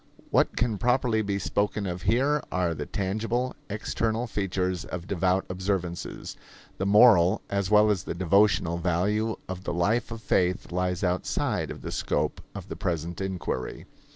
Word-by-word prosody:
What - - +3
can 115 -4 0
properly 125 -1 +2
be 100 -1 -1
spoken 100 +2 -1
of 90 -1 -4
here 135 +9 +2
are 90 -2 +1
the 75 -2 -5
tangible, 115 +6 -1
external 110 +2 -1
features 95 -5 -2
of 90 -1 -6
devout 95 0 +1
observances. 90 -2 -3 0.4
The 95 - 0
moral, 105 -2 +6
as 100 -1 0
well 105 0 +6
as 95 -5 -1
the - - -4
devotional 85 -1 +3
value 100 +6 0
of 95 0 -6
the - - -2
life 110 +7 +1
of 115 -1 -7
faith 90 0 +1
lies 90 0 -1
outside 90 0 0
of - - -8
the - - -5
scope - - -1
of - - -7
the - - -6
present 85 +1 -3
inquiry. 95 -9 -3
95 Hz, 155 wpm, -27 LUFS, 90-110 Hz, 0.4 s, moral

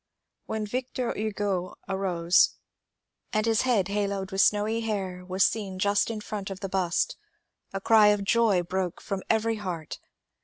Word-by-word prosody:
When 220 -1 -2
Victor 250 +2 -3
Hugo 205 -4 -2
arose, 185 -3 +2 0.8
and 215 +1 +1
his 225 -1 +3
head 230 -8 +2
haloed 200 -1 -2
with 195 0 +2
snowy 210 +4 +2
hair 190 -5 -3
was 185 +1 +2
seen 200 -4 -2
just 200 +3 +2
in 220 -2 -4
front 205 -2 -5
of 195 -1 -6
the 195 - -3
bust, 190 - 0 0.5
a 195 - -3
cry 215 +1 +6
of 205 -1 +3
joy 205 -3 +3
broke 180 0 -2
from 195 -1 -4
every 225 0 +2
heart. 180 -6 -5
200 Hz, 155 wpm, -27 LUFS, 190-220 Hz, 0.8 s, cry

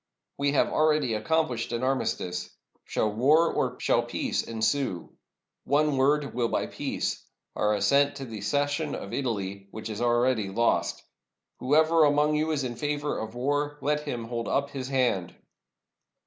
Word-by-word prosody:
We 140 0 +1
have - - +3
already 155 -6 +2
accomplished 120 0 0
an 120 +1 -2
armistice. 110 -9 -1 0.4
Shall 110 -1 -1
war 150 +9 +4
or - - -1
shall - - +2
peace - - -2
ensue? 115 -3 -2 0.5
One 145 +1 +2
word 140 +2 +2
will 120 -1 +1
buy - - -1
peace - - -3 0.2
— - - -54
our 105 0 +2
as 100 -1 0
sent 140 +4 +3
to 135 -1 -6
the 110 -4 -7
cession 145 +6 0
of 100 - -7
Italy, 100 -6 -3
which 110 +2 -7
is 105 - -5
already 120 -3 +2
lost. 115 +4 0 0.6
Who 135 +4 +1
ever 160 +1 +5
among 150 +1 +3
you 155 +1 +1
is 150 -3 0
in 120 -2 -4
favor 145 +1 -2
of 110 +1 -6
war, 145 +3 -1
let 150 +1 +1
him 125 -6 -4
hold 115 0 -4
up 140 +1 0
his 130 -2 -5
hand." 125 -10 0
130 Hz, 165 wpm, -27 LUFS, 115-145 Hz, 0.6 s, ever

